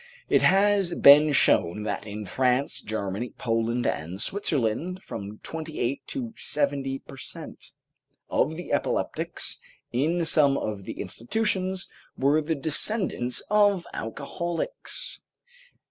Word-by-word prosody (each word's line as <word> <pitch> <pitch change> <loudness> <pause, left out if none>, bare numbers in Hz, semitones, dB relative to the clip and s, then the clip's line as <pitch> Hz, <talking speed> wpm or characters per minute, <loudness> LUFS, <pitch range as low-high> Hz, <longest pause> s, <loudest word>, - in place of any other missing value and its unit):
It - - +4
has 195 -2 +4
been 150 +2 +8
shown 105 -7 +3
that 105 0 -3
in 105 0 -5
France, 130 +5 +1
Germany, 105 +2 -3
Poland 115 +1 0
and 85 +5 -2
Switzerland, 165 - -1
from 100 0 -7
twenty 160 -1 -6
eight 125 +4 0
to 245 -5 -4
seventy 140 -2 -1
per 135 0 -13
cent. - - -9 0.6
of 155 +3 +1
the 175 - -5
epileptics - - -1 0.3
in 165 +7 +1
some 145 -4 +4
of 105 -3 -4
the - - -5
institutions 190 - -1 0.3
were 145 +3 +3
the 160 +2 -1
descendants 155 - -1
of 205 -4 +4
alcoholics. 170 - -4
140 Hz, 115 wpm, -26 LUFS, 115-175 Hz, 0.6 s, been